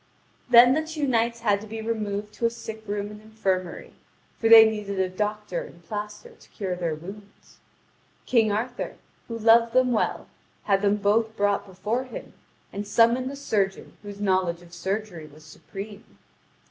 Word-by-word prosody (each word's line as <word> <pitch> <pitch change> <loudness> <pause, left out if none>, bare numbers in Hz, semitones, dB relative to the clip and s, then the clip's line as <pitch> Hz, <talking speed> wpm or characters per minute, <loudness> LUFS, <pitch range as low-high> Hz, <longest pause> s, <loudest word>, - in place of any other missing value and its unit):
Then 245 +1 +8
the 310 - +1
two 315 -2 -3
knights 235 -1 +1
had 205 -3 +2
to 215 - -10
be 225 +1 -6
removed 210 -2 -3
to 235 - +1
a - - 0
sick 220 -1 -8
room 205 0 -3
and 210 0 -11
infirmary, 195 -5 -3 0.5
for 225 - +2
they 225 -1 +10
needed 210 -2 -4
a 190 - +2
doctor 210 -1 -3
and 170 -1 -13
piaster 210 +2 -6
to - - -20
cure 190 -3 -4
their 170 -3 -2
wounds. 200 +6 -13 0.7
King 225 -4 +3
Arthur, 240 +4 -3 0.3
who 230 - -5
loved 230 +1 +5
them 255 -1 +4
well, 225 - 0 0.4
had 195 -1 +2
them 205 0 +3
both 220 +2 +1
brought 205 0 +1
before 210 +7 -3
him, 255 - -9 0.4
and 205 +1 -5
summoned 235 +4 +3
a 280 - -6
surgeon 205 -8 -2
whose 205 -1 -9
knowledge 185 -4 0
of 170 0 -17
surgery 190 -2 -4
was 155 +1 -17
supreme. 200 +6 -10
210 Hz, 170 wpm, -25 LUFS, 195-230 Hz, 0.7 s, they